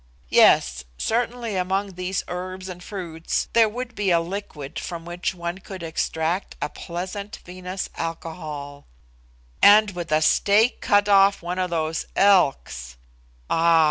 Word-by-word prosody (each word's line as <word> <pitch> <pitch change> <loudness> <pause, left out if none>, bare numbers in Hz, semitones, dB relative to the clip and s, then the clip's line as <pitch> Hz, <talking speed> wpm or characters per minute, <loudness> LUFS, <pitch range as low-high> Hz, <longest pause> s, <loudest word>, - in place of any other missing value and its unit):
Yes; 60 +1 +5
certainly 235 -1 -1
among 190 +2 -1
these 180 +1 -2
herbs 185 +1 -5
and 180 -1 -8
fruits 170 -5 -3
there 225 -2 +5
would 245 +2 -6
be 205 -4 -1
a 170 -2 +4
liquid 165 -5 -6
from 170 -1 -6
which 175 +1 -3
one 170 +1 -4
could 190 -2 -9
extract 165 +2 -2
a - - -2
pleasant 190 +4 -6
vinous 185 +1 -5
alcohol; 155 -4 -6 0.7
and 210 +1 +7
with 175 -3 -6
a 155 0 +3
steak 210 +8 +3
cut 205 -1 +3
off 195 -2 +5
one 180 +2 -3
of 185 -1 0
those 160 -1 -2
elks 135 - +2 0.5
(ah! 165 0 +4
180 Hz, 140 wpm, -23 LUFS, 165-200 Hz, 0.7 s, and